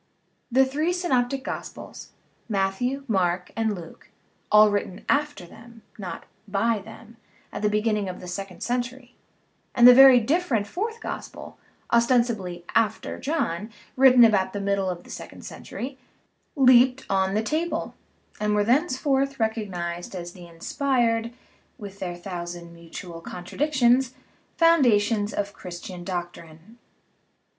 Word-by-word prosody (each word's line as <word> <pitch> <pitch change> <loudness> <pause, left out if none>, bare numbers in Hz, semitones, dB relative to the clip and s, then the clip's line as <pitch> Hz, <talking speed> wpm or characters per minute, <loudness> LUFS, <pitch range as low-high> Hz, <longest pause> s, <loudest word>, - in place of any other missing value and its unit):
The 265 +2 +5
three 305 +6 -1
synoptic 270 -7 0
gospels - - -7 0.4
(Matthew, 215 +7 -1
Mark, 180 -4 0
and 220 -2 0
Luke 170 -3 -12 0.4
all 210 0 +7
written 200 -2 -3
after 290 -9 0
them, 225 +5 -15 0.2
not 190 -3 -6 0.2
by 210 +3 +1
them, 225 +3 -13 0.4
at - - -5
the 210 - +2
beginning 210 -2 0
of 180 - -7
the 180 - -10
second 185 +1 -6
century) 245 +1 -3 0.6
and 240 -1 +8
the 250 - +11
very 265 -1 +9
different 255 - 0
fourth 445 - -4
gospel - - -8 0.3
(ostensibly 235 -7 +1
"after" 220 -1 0
John, 225 - -2 0.3
written 255 -2 +7
about 195 -4 +3
the 205 - -3
middle 200 -1 0
of 175 -1 -5
the - - -14
second - - -9
century) 265 +2 -7 0.6
leaped 255 -1 +5
on 190 0 +1
the 215 - +1
table, 320 +8 -2 0.5
and 210 0 0
were 205 - +3
thenceforth 275 +1 +1
recognized 190 -6 -3
as 175 -1 -7
the 175 -2 -12
inspired 230 +6 0 0.5
(with 200 -4 -10
their 175 -2 -4
thousand 175 -1 -7
mutual 170 0 -10
contradictions) 250 - 0 0.4
foundations 230 -10 +3
of 205 0 -3
Christian 180 0 -8
doctrine. 175 +3 -7
220 Hz, 130 wpm, -25 LUFS, 190-255 Hz, 0.6 s, the